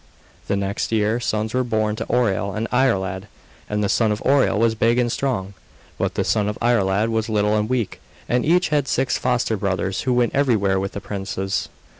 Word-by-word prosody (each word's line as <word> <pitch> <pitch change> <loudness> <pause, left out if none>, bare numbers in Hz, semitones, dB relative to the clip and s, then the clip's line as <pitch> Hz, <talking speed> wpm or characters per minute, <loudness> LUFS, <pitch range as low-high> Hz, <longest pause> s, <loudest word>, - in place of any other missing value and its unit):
The - - +1
next 100 +2 -2
year 110 +1 +1
sons 110 -2 -2
were 130 0 +1
born 110 -3 0
to - - -4
Oireal 100 -5 +1
and 115 +2 -2
Iarlaid; 100 -7 +1 0.4
and 105 0 -1
the - - +2
son 110 +1 +2
of 105 - -1
Oireal 135 -5 +3
was 115 +1 +3
big 115 +2 +2
and 120 -1 +1
strong, 110 -9 -2 0.5
but - - -1
the - - +1
son 105 -2 +1
of 105 - -4
Iarlaid 110 -2 +2
was 110 0 -1
little 105 0 +2
and 105 +1 0
weak, 125 -5 -2 0.3
and 125 0 +1
each 180 +3 +3
had 145 -3 +1
six 135 - 0
foster 120 -3 0
brothers 95 -1 -1
who 130 - 0
went 120 -1 +2
everywhere 110 -9 +2
with 95 0 -3
the 100 - -5
princes. 95 0 -3
110 Hz, 200 wpm, -22 LUFS, 100-120 Hz, 0.5 s, Oireal